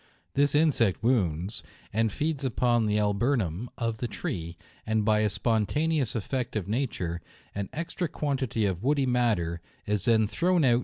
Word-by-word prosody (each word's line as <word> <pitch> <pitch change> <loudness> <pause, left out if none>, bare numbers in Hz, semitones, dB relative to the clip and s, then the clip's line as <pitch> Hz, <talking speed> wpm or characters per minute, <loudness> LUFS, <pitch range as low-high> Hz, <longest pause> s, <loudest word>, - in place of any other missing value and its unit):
This 145 +1 +2
insect 135 - +3
wounds, 100 -5 +1 0.3
and 110 0 +2
feeds 150 +4 -2
upon 120 -2 +2
the 105 0 +1
alburnum 105 - 0
of 115 -2 -1
the 120 - -2
tree, 85 -5 -5 0.3
and 110 -1 0
by 105 -1 +4
a 105 0 +2
spontaneous 130 +7 0
effort 120 +2 -2
of 100 -4 -2
nature, 100 -8 -2 0.3
an 100 -1 -4
extra 170 +2 -3
quantity 135 -8 -1
of 95 -3 -1
woody 140 +2 +2
matter 110 -10 +1 0.2
is 105 -2 -1
then 110 -2 +4
thrown 175 - +2
out. 120 -2 +4
115 Hz, 155 wpm, -28 LUFS, 105-135 Hz, 0.3 s, by